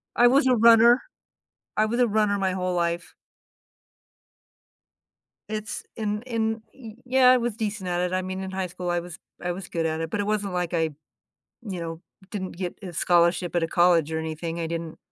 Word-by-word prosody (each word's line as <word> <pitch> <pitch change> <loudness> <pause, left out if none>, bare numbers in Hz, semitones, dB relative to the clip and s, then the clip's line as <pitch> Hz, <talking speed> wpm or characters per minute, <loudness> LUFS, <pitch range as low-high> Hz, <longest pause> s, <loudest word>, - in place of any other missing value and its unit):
I 245 - +6
was 260 +2 +4
a 255 - +5
runner. 235 +2 +7 0.8
I 215 - +3
was 235 +3 -1
a 245 - +4
runner 210 -1 +2
my 190 -1 0
whole 185 -1 -1
life. 170 0 -1 2.4
It's 215 0 -4
in 210 -1 -2
in 225 -2 -1
Y 230 -5 -10
yeah, 255 0 +5
I 255 - +6
was 240 -3 -2
decent 210 -4 -3
at 175 0 0
it, 180 0 -1
I 185 - +1
mean 185 +1 -5
in 190 0 -5
high 190 -1 -2
school 180 0 -4
I 175 - +1
was 175 0 -9 0.2
I 175 - -1
was 185 +1 -6
good 165 -2 -2
at 160 0 -2
it, 165 -1 -4
but - - -2
it 205 - -1
wasn't 205 -3 -1
like 180 -1 -1
I, 160 -1 +1 0.7
you 195 -7 -6
know, 165 -1 -5 0.3
didn't 190 -4 -5
get 180 -1 -5
a 180 -3 -7
scholarship 175 +1 +2
at 175 - +2
a - - +2
college 175 -3 +3
or 160 - -1
anything, 160 +1 -4
I 165 - -2
didn't 165 -1 -5
185 Hz, 200 wpm, -25 LUFS, 170-215 Hz, 2.4 s, runner